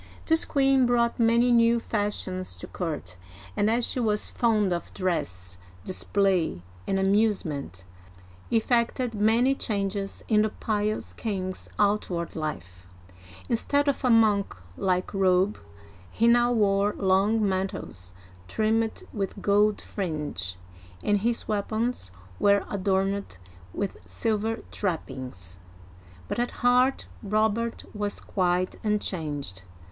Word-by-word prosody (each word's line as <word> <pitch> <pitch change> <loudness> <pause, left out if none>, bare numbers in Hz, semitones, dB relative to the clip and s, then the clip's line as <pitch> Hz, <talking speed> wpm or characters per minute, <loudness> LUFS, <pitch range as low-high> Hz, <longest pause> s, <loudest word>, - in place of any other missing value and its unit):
This 320 0 +3
queen 270 -3 +3
brought 235 -1 +2
many 235 +2 +4
new 235 0 +5
fashions 205 -4 -2
to - - -8
court, 150 - -5 0.4
and 205 - +2
as 235 +1 +2
she - - -2
was 210 -3 0
fond 215 -5 +2
of 170 - -4
dress, 95 - -3 0.3
display, 185 - 0 0.2
and 195 - +1
amusement, 190 - 0 0.6
effected 235 +1 +1
many 225 +5 +3
changes 200 -5 -2
in 210 -2 +4
the 215 - +2
pious 210 0 -2
king*s 185 -4 -4
outward 200 -5 0
life. 90 - -5 0.6
Instead 285 +5 +1
of 280 0 0
a 250 - +3
monk 215 - +4 0.2
like 185 0 0
robe, 190 +1 +2 0.5
he 230 - +1
now 240 +1 +5
wore 205 -2 +2
long 200 +3 +3
mantles 185 - -4 0.3
trimmed 220 - 0
with 200 -1 -3
gold 205 +1 +3
fringe, 150 - -4 0.5
and 205 -1 +2
his 235 +3 -1
weapons 215 - -1 0.3
were 200 -1 +4
adorned 195 - 0 0.3
with 200 - -3
silver 225 0 -1
trappings. 130 - -4 0.7
But - - -3
at 240 - +1 0.2
heart 250 +2 +4 0.2
Robert 220 +2 0
was 205 -1 -3
quite 180 -1 0
unchanged. 155 - -2
205 Hz, 115 wpm, -26 LUFS, 185-225 Hz, 0.7 s, new